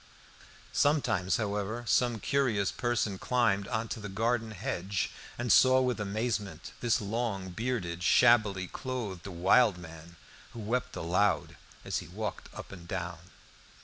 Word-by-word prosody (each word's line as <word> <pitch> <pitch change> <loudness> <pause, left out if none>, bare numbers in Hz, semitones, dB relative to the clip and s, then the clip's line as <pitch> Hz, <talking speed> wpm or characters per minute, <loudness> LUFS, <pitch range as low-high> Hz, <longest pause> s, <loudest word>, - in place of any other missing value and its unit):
Sometimes, 120 - +2
however, 105 +1 -2
some 120 0 +2
curious 115 -7 +1
person 115 -5 -1
climbed 110 -6 +1
on 115 0 -2
to 115 +2 -4
the 105 -2 -6
garden 115 +3 0
hedge, 95 -2 -2 0.3
and 120 -1 -1
saw 130 +5 +7
with 125 -3 0
amazement 105 0 -3
this 120 -2 +2
long 100 -3 -2
bearded, 95 -6 -3
shabbily 100 -1 +4
clothed, 105 -4 -5
wild 95 +3 +4
man, 80 -1 -11 0.4
who 120 - -8
wept 120 +4 -2
aloud 90 +3 +1 0.3
as - - -1
he - - -9
walked - - -5
up - - -9
and 85 -3 -10
down. 90 -1 -5
105 Hz, 135 wpm, -30 LUFS, 95-120 Hz, 0.4 s, saw